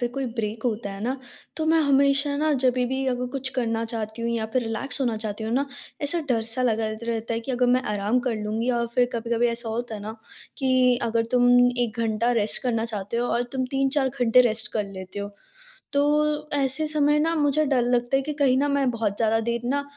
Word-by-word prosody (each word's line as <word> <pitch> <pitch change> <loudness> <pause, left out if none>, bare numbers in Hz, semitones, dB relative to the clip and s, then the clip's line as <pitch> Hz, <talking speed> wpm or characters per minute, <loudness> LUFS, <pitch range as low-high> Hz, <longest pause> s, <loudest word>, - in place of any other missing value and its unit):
फिर 245 - 0
कोई 275 -1 -2 0.2
ब्रेक 220 +1 -4
होता 220 -4 -1
है 195 - -8
न 255 +3 -1 0.4
तो 315 - -1
मैं 320 +1 +4
हमेशा 280 0 +3
न 310 0 +2
जभी 250 0 +3
भी 265 +2 -2
अगर 250 -1 -1
कुछ 270 -1 -3
करना 225 -1 -1
चाहती 225 0 -5
हूँ 235 - -1
या 230 -2 -1
फिर 255 - +1
रिलैक्स 225 +5 -3
होना 240 -4 0
चाहती 215 0 -4
हूँ 220 - -2
न 275 +2 +2 0.4
ऐसा 290 +4 +1
डर 230 -3 +1
सा 255 +2 0
लगा 225 -3 +1
रह 215 - -5
रहता 230 0 -2
है 230 - -2
कि 260 +3 -4
अगर 250 0 +2
मैं 255 - -1
आराम 205 +4 +1
कर 235 - 0
लूँगी 220 +4 -1
और 235 - 0
फिर 245 -1 +3
कभी-कभी 235 0 0
ऐसा 235 0 -2
होता 230 +1 -3
है 210 - -6
न - - -8 0.4
कि 255 -2 +3
अगर 230 0 +1
तुम 245 -1 +4 0.3
1 235 -2 -1
घंटा 230 +1 +1
रेस्ट 210 - +1
करना 230 -3 0
चाहते 210 -1 -4
हो 240 +1 0
और 240 - +1
तुम 260 -1 -1
3-4 270 0 +1
घंटे 250 -2 +4
रेस्ट 225 -2 0
कर 215 -2 0
लेते 190 +1 -8
हो। 200 0 -6 0.6
तो 300 +1 +1
ऐसे 275 +1 0
समय 300 -1 +2
न 310 +2 +2
मुझे 295 +1 +2
डर 265 -3 +2
लगता 245 +1 +1
है 270 - +1
कि 300 +3 -4
कहीं 270 -3 +4
न 285 +1 +1
मैं 280 -2 +2
बहुत 220 -4 -2
ज़्यादा 225 0 +2
देर 235 +1 -2
न 285 0 0
245 Hz, 230 wpm, -25 LUFS, 225-270 Hz, 0.6 s, मैं